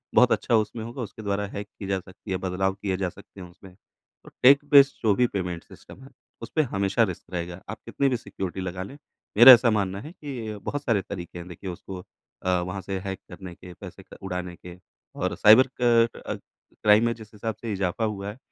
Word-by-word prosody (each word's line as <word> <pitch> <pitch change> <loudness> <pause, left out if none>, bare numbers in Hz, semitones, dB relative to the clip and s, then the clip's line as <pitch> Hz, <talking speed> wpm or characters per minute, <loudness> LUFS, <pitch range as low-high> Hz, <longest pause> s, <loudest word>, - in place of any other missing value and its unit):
बहुत - - +6
अच्छा 115 - +2
उसमें 110 +1 -1
होगा 120 +3 -7
उसके 110 -1 -7
द्वारा 100 -1 -1
हैक 100 +1 -7
की 100 - -6
जा 95 -1 0
सकती 95 +1 -12
है, 95 - 0
बदलाव 95 +1 -1
किए 95 -2 -3
जा 95 -1 -1
सकते 100 +1 -14
हैं 90 - -8
उसमें। 90 +1 -16 0.5
तो - - -13
टेक-बेस्ड 140 +1 +7
जो 110 -2 +4
भी 125 +2 +3
पेमेंट 90 -5 -4
सिस्टम 135 - -15
है 135 - -13 0.3
उसपे 135 +7 0
हमेशा 100 -4 +1
रिस्क 95 -6 -4
रहेगा। 85 +1 -5
आप - - -6
कितनी 140 - 0
भी 125 - 0
सिक्योरिटी 95 -5 -6
लगा 95 0 -4
लें, 120 +9 -10 0.4
मेरा 120 +3 +12
ऐसा 120 0 +5
मानना 100 -2 -1
है 155 - -9
कि 125 - -7
बहुत 145 0 -3
सारे 115 -7 +1
तरीके 90 -2 -8
हैं 85 - -9
देखिए 90 +2 -8
उसको 90 +1 -8 0.4
अ, 95 - -1
वहाँ 90 +2 -5
से 95 +1 -4
हैक 95 -1 -4
करने 95 -2 -9
के 90 0 -12
पैसे - - -11
क - - -14
उड़ाने 90 -2 -4
के 90 0 -12 0.4
और - - -1
साइबर 110 +5 +7
क 115 -1 +4 0.2
अ, - - -2 0.5
क्राइम 105 +2 +6
में 115 - +1
जिस 110 -2 -14
हिसाब 110 +1 -4
से 115 - -4
इज़ाफ़ा 100 +3 -1
हुआ 100 -2 -4
है, 105 - -9
100 Hz, 215 wpm, -25 LUFS, 95-115 Hz, 0.5 s, मेरा